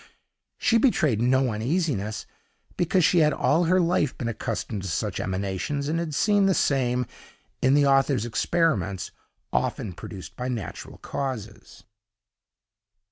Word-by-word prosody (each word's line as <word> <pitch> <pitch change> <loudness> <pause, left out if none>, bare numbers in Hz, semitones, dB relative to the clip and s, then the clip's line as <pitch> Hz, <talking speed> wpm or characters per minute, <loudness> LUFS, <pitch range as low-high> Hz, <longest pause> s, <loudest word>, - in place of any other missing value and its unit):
She 230 -1 +3
betrayed 155 - +2
no 130 +1 +3
uneasiness, 110 - -1 0.5
because 175 0 +2
she 175 - +4
had 150 -2 +4
all 165 +5 +2
her 185 +3 +3
life 170 -5 +1
been 120 - -3
accustomed 110 -2 -3
to 95 - -5
such 80 - -2
emanations, 95 +10 -2
and 165 +2 0
had 160 -3 -3
seen 205 +1 +3
the 190 - +3
same, 125 -3 +1 0.6
in 130 +2 +4
the 145 -1 +4
author's 135 -4 +3
experiments, 110 - 0 0.4
often 100 - -1
produced 90 -2 -9
by 125 - -4
natural 120 -6 -5
causes. 130 -6 -6
135 Hz, 135 wpm, -25 LUFS, 110-165 Hz, 0.6 s, she